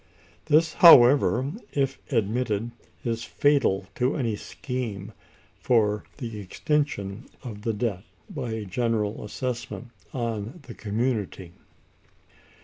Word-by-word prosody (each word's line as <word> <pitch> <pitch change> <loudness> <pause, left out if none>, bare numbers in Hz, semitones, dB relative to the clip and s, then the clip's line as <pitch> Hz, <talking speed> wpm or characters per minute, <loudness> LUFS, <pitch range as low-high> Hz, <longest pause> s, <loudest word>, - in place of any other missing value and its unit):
This, 160 +2 +3
however, 135 -3 +7 0.2
if 135 -2 0
admitted, 115 -1 0 0.3
is 115 -1 -1
fatal 140 -10 +2
to 125 +3 0
any 115 -6 0
scheme 110 -3 -5 0.5
for 105 -4 +2
the 115 -5 -6
extinction 105 - -2 0.2
of 110 -5 -7
the 115 +1 -1
debt 105 -3 -2 0.3
by 145 - -5
a 110 -2 -4
general 110 +1 -1
assessment 120 +2 -5 0.2
on 115 - -3
the 125 - -9
community. 105 -5 -2
115 Hz, 105 wpm, -26 LUFS, 105-130 Hz, 0.5 s, however